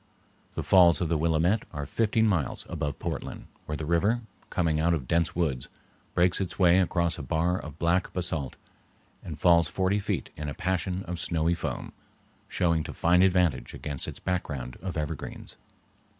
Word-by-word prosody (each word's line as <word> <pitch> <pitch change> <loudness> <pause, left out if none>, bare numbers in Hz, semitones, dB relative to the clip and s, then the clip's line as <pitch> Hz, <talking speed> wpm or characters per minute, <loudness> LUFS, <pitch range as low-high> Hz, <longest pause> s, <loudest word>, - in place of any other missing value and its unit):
The - - -2
Falls 90 -3 +6
of 85 - -1
the 85 - +2
Willamette 85 +6 +2
are 75 -2 -4
fifteen 110 +6 +2
miles 85 - 0
above 75 -4 -3
Portland, - - -5 0.2
where 75 - -3
the 80 - -4
river, 100 +9 +2 0.3
coming 80 -5 +1
out 85 +1 +3
of 65 -6 -5
dense 85 +3 +1
woods, 75 -8 -1 0.5
breaks 90 +2 +3
its 90 -3 -4
way 90 -1 +5
across 85 -3 +1
a - - -3
bar 80 +6 0
of 75 -1 -9
black 85 +3 +1
basalt 85 -7 -2 0.7
and 80 -3 -6
falls 85 -2 +5
forty 95 +5 0
feet 100 - -3
in 75 -1 -4
a 70 - -6
passion 95 +1 -1
of 90 -1 -5
snowy 80 0 +1
foam, - - -4 0.6
showing 85 -3 +1
to - - -6
fine 90 +2 +3
advantage 90 -8 +2
against 70 -2 -4
its - - -7
background 70 -9 -3
of 95 -3 -4
evergreens. 75 0 -5
85 Hz, 170 wpm, -28 LUFS, 80-90 Hz, 0.7 s, Falls